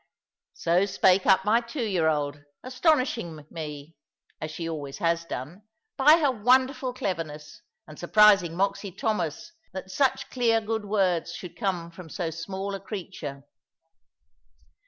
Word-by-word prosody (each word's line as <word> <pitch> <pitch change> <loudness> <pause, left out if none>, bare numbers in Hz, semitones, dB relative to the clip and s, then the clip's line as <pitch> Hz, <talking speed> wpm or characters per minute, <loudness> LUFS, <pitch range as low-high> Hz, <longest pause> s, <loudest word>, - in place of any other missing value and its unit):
So 175 +4 +2
spake 190 -1 +3
up 190 0 +5
my 225 +3 +4
two 235 +2 -5
year 185 -7 +1
old, 145 -2 -1 0.2
astonishing 255 - 0
me 150 -1 -7 0.5
(as 155 - -3
she 165 +1 -5
always 145 -4 -5
has 170 -2 0
done) 160 +6 -6 0.3
by 300 +4 +7
her 295 -5 +2
wonderful 255 +3 +2
cleverness, 165 -5 -5 0.3
and 155 -1 -12
surprising 195 -2 +5
Moxy 195 +1 -1
Thomas 190 - -2 0.2
that 190 0 -7
such 265 +7 0
clear 235 -3 +2
good 220 -1 -3
words 190 -5 0
should 175 -2 -9
come 180 -6 -2
from 170 -1 -11
so 170 -1 -3
small 190 +4 -5
a 195 - -4
creature. 180 -9 -7
190 Hz, 135 wpm, -26 LUFS, 165-220 Hz, 0.5 s, by